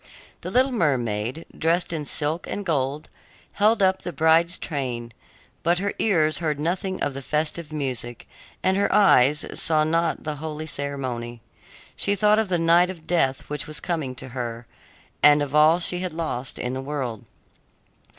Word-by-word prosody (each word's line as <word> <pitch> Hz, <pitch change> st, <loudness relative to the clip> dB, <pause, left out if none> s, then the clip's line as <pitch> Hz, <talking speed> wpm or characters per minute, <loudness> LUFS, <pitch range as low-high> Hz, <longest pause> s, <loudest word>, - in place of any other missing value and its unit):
The -, -, -5 dB
little 260 Hz, +2 st, +3 dB
mermaid, 130 Hz, -, -1 dB
dressed 170 Hz, +2 st, 0 dB
in 155 Hz, -2 st, -3 dB
silk 155 Hz, +4 st, -1 dB
and 205 Hz, -, -4 dB
gold, 145 Hz, -2 st, -1 dB, 0.5 s
held 215 Hz, +1 st, +3 dB
up 190 Hz, 0 st, +2 dB
the 175 Hz, -, -5 dB
bride's 165 Hz, +3 st, +3 dB
train; 125 Hz, -7 st, -4 dB, 0.5 s
but 170 Hz, +2 st, +2 dB
her 200 Hz, +2 st, -2 dB
ears 155 Hz, -8 st, +2 dB
heard 155 Hz, -4 st, -1 dB
nothing 185 Hz, +4 st, -2 dB
of 145 Hz, -, -1 dB
the 135 Hz, -, -6 dB
festive 155 Hz, +3 st, -2 dB
music, 130 Hz, -5 st, -4 dB, 0.4 s
and 190 Hz, 0 st, +2 dB
her 200 Hz, -, +1 dB
eyes 150 Hz, -8 st, +5 dB
saw 155 Hz, -1 st, +3 dB
not 165 Hz, +1 st, 0 dB
the 150 Hz, -1 st, -4 dB
holy 155 Hz, +1 st, -5 dB
ceremony. 130 Hz, -5 st, -5 dB, 0.6 s
She 200 Hz, -, 0 dB
thought 210 Hz, +2 st, +4 dB
of 220 Hz, -3 st, -1 dB
the 180 Hz, -, +2 dB
night 170 Hz, +2 st, +4 dB
of 170 Hz, -4 st, -9 dB
death 135 Hz, -7 st, 0 dB
which 150 Hz, +2 st, -3 dB
was 155 Hz, +1 st, -5 dB
coming 155 Hz, -7 st, -3 dB
to 130 Hz, -, -8 dB
her, 120 Hz, -2 st, -5 dB, 0.6 s
and 150 Hz, 0 st, +7 dB
of 140 Hz, -1 st, -6 dB
all 155 Hz, +2 st, +6 dB
she 180 Hz, 0 st, +1 dB
had 180 Hz, -2 st, -4 dB
lost 155 Hz, -6 st, -4 dB
in 125 Hz, -, -3 dB
the 130 Hz, -, -3 dB
world. 135 Hz, -6 st, -4 dB
155 Hz, 170 wpm, -24 LUFS, 135-175 Hz, 0.6 s, and